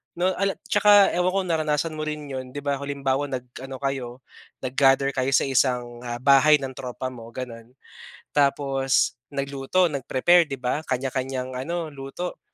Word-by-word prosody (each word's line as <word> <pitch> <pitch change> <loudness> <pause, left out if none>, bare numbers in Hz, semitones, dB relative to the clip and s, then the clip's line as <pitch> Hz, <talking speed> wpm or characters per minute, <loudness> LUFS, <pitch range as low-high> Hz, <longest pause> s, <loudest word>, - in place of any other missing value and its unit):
'no, 180 +2 +1
ala 195 0 +1 0.2
tsaka 205 -1 +6
ewan 180 +1 +2
kung - - -7
naranasan 155 0 0
mo 155 0 -4
rin 150 -1 -4
'yon. 130 0 -6
Di 145 - -5
ba 140 -1 -1
halimbawa, 140 0 -1
nag-ano 130 +1 -7
kayo, 130 -2 -3 0.4
nag-gather 135 +1 +3
kayo 130 0 -1
sa - - +4
isang, 125 -2 0
ah, 120 0 -3
bahay 140 +2 +6
ng 135 - -4
tropa 130 +1 -5
mo 115 -2 -10
gano'n, 115 -3 -7 0.7
tapos 135 -2 +2 0.2
nagluto, 140 +6 +1
nag-prepare, 140 +6 +3
di 135 - -4
ba 125 +3 -2
kanya-kanyang 130 0 -3
ano 165 +5 -3
luto, 140 +6 -6
135 Hz, 155 wpm, -24 LUFS, 130-150 Hz, 0.7 s, tsaka